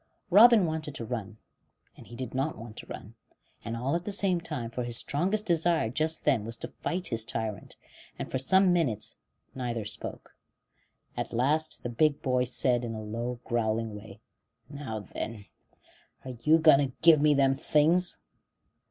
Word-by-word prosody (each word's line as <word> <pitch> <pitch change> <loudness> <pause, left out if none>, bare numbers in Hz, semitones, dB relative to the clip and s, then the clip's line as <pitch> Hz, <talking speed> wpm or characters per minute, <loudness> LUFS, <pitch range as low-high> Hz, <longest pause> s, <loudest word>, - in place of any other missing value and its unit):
Robin 215 +1 +8
wanted 155 -3 -4
to 115 - -5
run, 110 -3 -5 0.6
and - - -14
he 120 - -11
did 125 -1 -6
not 135 +4 -1
want 115 -1 -10
to - - -10
run, - - -9 0.5
and 115 +1 -4
all 130 +6 -1
at 170 - -2
the 205 - -4
same 190 -3 +1
time, 150 -8 -4
for 125 +1 -3
his 120 -1 0
strongest 195 +9 0
desire 165 - +1
just 155 +4 -1
then 135 -8 +3
was 115 +1 -4
to - - -6
fight 180 +1 -2
his 115 -2 +1
tyrant; 110 -2 -5 0.4
and - - -6
for 130 - -1
some 190 +7 +4
minutes 145 - -1 0.4
neither 120 -4 -3
spoke. 105 -1 -7 0.8
At - - -4
last 150 +7 0
the 120 - -3
big 145 +5 +2
boy 125 -2 +1
said, 125 0 +1
in 115 -1 -4
a 110 - -6
low, 120 +3 -4
growling 115 -2 -1
way: 105 -1 -11 0.5
"Now 130 -7 -5
then, 105 +2 -6 0.8
are 130 - -5
you 155 +5 +5
going 155 -4 +6
to 135 -2 -1
give 165 -3 +7
me 150 -1 +4
them 135 -1 +4
things?" 160 +6 +2
130 Hz, 175 wpm, -28 LUFS, 115-160 Hz, 0.8 s, Robin